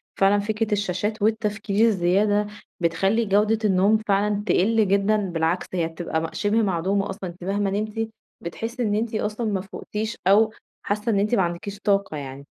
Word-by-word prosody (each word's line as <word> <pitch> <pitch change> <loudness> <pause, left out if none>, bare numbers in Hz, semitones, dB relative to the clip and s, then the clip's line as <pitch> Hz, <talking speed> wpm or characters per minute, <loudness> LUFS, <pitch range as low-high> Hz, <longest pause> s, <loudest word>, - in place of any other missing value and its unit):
فعلًا 200 +1 +4
فكرة 215 +1 -2
الشاشات 205 +2 -1
والتفكير 215 0 +1
الزيادة 205 +2 +2 0.3
بتخلِّي 195 +7 +1
جودة 210 +2 +2
النوم 200 +2 +4
فعلًا 205 +1 +1
تقِلّ 215 +3 +3
جدًا، 200 +2 +3
بالعكس، 175 -3 -1
هي 170 -3 0
بتبقى 165 -1 -3
مَ 165 - -2
شِبه 215 +2 +1
معدومة 195 0 0
أصلًا، 195 -1 -5
أنتِ 175 +1 -12
مهما 200 +1 0
نمتِ 215 +2 -2 0.3
بتحِسِّي 230 +8 -4
إن 205 -2 +1
أنتِ 220 +1 -1
أصلًا 215 +1 -2
ما 195 -2 -1
فُقتيش 210 +3 -5
أو 215 +3 +5 0.3
حاسّة 210 +3 -1
إن 200 - +2
أنتِ 210 +4 +2
ما 195 - +3
عندكيش 180 +3 -3
طاقة 200 -6 0
يعني، 140 0 -8
205 Hz, 165 wpm, -24 LUFS, 185-215 Hz, 0.3 s, أو